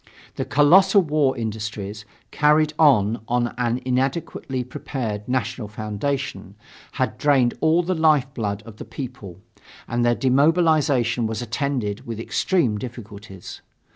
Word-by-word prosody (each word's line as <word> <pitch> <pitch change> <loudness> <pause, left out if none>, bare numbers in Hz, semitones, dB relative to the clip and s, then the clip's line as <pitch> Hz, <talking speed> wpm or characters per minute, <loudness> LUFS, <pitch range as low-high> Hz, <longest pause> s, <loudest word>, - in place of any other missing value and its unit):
The - - -3
colossal 190 +7 +5
war 150 -4 +1
industries, 105 -2 -5 0.3
carried 150 +1 +3
on 115 -8 +4
on 120 0 0
an 120 0 0
inadequately 130 0 -2
prepared 120 -4 -5
national 125 -3 -2
foundation, 110 0 -4 0.4
had - - -2
drained 135 -5 +3
all 160 +2 +3
the 185 +2 -1
lifeblood 135 - +1
of 110 -2 -12
the - - -8
people; 105 -9 -8 0.5
and 120 0 -1
their 120 0 +3
demobilization 140 -4 +2
was 110 +2 -4
attended 120 -3 -3
with 115 -2 -5
extreme 120 - 0
difficulties. 105 -5 -9
125 Hz, 120 wpm, -22 LUFS, 110-145 Hz, 0.5 s, colossal